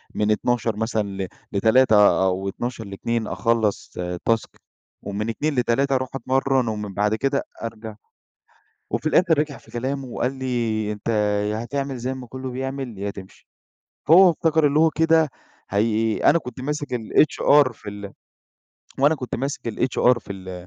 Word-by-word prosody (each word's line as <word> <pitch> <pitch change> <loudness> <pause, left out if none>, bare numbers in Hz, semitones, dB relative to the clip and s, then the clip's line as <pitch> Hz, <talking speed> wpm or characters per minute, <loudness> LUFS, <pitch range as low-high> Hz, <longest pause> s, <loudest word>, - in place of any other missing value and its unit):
من 105 0 +1
12:00 115 0 0
مثلًا 110 0 -1
ل 95 -1 -4 0.2
ل15:00 110 -1 +4
أو 95 +1 -1
12:00 120 +2 -5
ل14:00 110 +4 -3
أخلّص 115 -3 0 0.4
task 115 -1 +1 0.5
ومن 100 +2 -4
14:00 145 +6 -2
ل15:00 135 +3 +1
أروح 130 0 -1
أتمرن 135 0 +1
ومن 105 -2 -4
بعد 105 +2 +1
كده 135 +4 0 0.2
أرجع. 110 -1 -6 1.0
وفي - - -3
الآخر 165 0 +3
رجع 150 -2 -1
في - - -20
كلامه 130 +4 -3
وقال 125 +1 -2
لي: 120 -5 -2
"أنت 105 +1 -7 0.4
ياهتعمل 135 +5 -3
زي 125 +2 -3
ما 130 -1 -8
كله 130 +2 -6
بيعمل 130 -3 -5
يا 100 +1 -3
تمشي." 95 -1 -12 0.6
هو 180 +3 +8
افتكر 160 -2 +2
اللي 145 +2 +2
هو 160 0 +5
كده 160 -1 +3 0.4
هي 110 +2 +1
أنا 170 - +4
كنت 125 -3 -9
ماسك 145 +2 -3
الHR 140 +3 +3
في 105 - -10
ال 100 -1 -8 0.9
وأنا 145 +4 +4
كنت 130 -5 -6
ماسك 135 -1 -3
الHR 125 +1 +2
في 105 - -8
ال 95 -2 -9
120 Hz, 150 wpm, -23 LUFS, 105-135 Hz, 1.0 s, هو